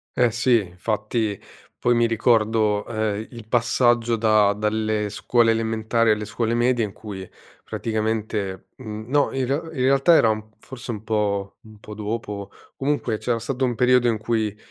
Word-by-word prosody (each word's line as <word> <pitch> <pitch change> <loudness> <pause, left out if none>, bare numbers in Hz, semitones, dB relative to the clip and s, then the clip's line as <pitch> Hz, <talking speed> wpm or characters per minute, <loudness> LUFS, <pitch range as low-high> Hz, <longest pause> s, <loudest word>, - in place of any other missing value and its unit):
Eh, 125 -2 +3
sì. 120 0 +3
Infatti, 105 +3 -2 0.4
poi 120 - +2
mi 120 0 +3
ricordo, 110 -2 +2
ehm, 110 -1 -2
i - - -14
il 115 -2 -10
passaggio 120 0 +2
da 110 -2 +3
dalle 105 0 -1
scuole 115 +2 +2
elementari 115 0 +1
alle 105 0 0
scuole 115 +2 -1
medie 120 0 +2
in 105 - -3
cui 100 -4 -8 0.3
praticamente 110 -3 -3
mhmm, 110 -4 -7
no 145 0 +2
in 135 -1 0
re 135 +3 +1 0.2
in - - -1
realtà 140 +5 +5
era 115 - +5
un 110 0 -3
forse 130 -1 -10
un 110 -2 -6
po' 100 -2 -1
un 110 -2 -15
po' 105 0 -10
dopo, 105 -1 -5 0.3
comunque 135 -5 -1
c'era 120 -2 0
stato 125 +3 -3
un 120 - -1
periodo 125 0 +4
in 115 -2 +1
cui 110 -1 -1
110 Hz, 165 wpm, -23 LUFS, 105-120 Hz, 0.4 s, realtà